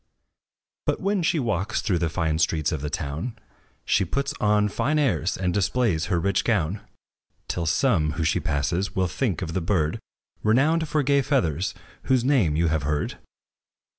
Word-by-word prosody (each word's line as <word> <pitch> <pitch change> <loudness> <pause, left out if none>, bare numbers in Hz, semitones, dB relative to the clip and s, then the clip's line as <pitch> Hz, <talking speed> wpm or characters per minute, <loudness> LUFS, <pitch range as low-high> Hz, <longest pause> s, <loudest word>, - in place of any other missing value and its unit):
But - - +1
when 200 0 0
she 170 0 +1
walks 115 - -1
through 95 -6 0
the 85 -1 0
fine 80 -1 -1
streets 80 -1 +1
of 80 - -3
the 75 - -3
town, 80 - -4 0.5
She 100 - +2
puts 140 +10 -2
on 105 -1 +3
fine 145 +8 0
airs, 95 - +1
and 90 -2 -1
displays 100 -3 +1
her 90 -2 0
rich 100 +2 +1
gown; 100 -4 0 0.7
Till 85 -2 -2
some, 80 - +2
whom 80 - -2
she - - +2
passes, 85 +7 -1
will 95 -1 +2
think 95 - -1
of 80 -2 -4
the 95 - -1
bird 80 -3 0 0.4
Renowned 150 +9 +3
for 150 -2 +1
gay 140 +1 +3
feathers, 95 - 0 0.3
whose 130 -2 +2
name 120 - +3
you 85 +2 +2
have 80 -1 0
heard. 75 +1 -2
95 Hz, 170 wpm, -25 LUFS, 80-125 Hz, 0.7 s, on